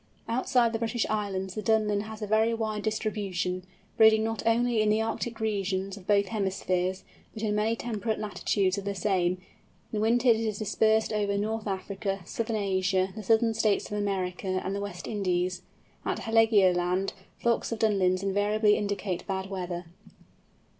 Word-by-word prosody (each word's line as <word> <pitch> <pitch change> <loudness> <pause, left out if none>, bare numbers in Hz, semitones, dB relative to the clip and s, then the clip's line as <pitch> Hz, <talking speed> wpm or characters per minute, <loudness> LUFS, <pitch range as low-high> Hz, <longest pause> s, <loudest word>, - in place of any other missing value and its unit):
Outside 240 0 +2
the 225 - -1
British 230 0 0
Islands 195 -3 -2
the 215 - -4
Dunlin 215 -2 +2
has 220 0 -7
a - - 0
very 220 +2 +2
wide 215 -2 -2
distribution, 200 -4 -2 0.3
breeding 220 -1 +6
not 225 0 -2
only 235 0 +3
in 215 - +2
the 215 +1 +3
Arctic 225 +1 -2
regions 195 -3 -1
of 195 -3 -13
both 200 -2 +3
hemispheres, 190 -3 -1 0.3
but 220 - -6
in 210 -1 +1
many 215 +2 +1
temperate 225 -1 -2
latitudes 200 -2 0
of 200 - -8
the 200 0 -2
same; 180 -2 +1 0.5
in 210 - 0
winter 240 +3 +3
it 225 - +6
is 220 -2 -2
dispersed 220 +1 +2
over 205 -1 0
North 220 +1 -2
Africa, 195 0 -3
Southern 225 +4 -2
Asia, 190 -2 +1
the 215 - -5
Southern 225 +2 +3
States 215 -2 +1
of 210 - -2
America, 190 -2 -2 0.2
and 195 - -2
the 200 - -3
West 200 -3 -6
Indies. 185 -3 -1 0.4
At - - -1
Heligoland, 195 -5 +3 0.2
flocks 235 0 0
of 230 - -1
Dunlins 195 -4 +2
invariably 210 +2 +2
indicate 200 -3 -3
bad 190 0 -3
weather. 180 -2 -4
210 Hz, 165 wpm, -28 LUFS, 190-220 Hz, 0.5 s, breeding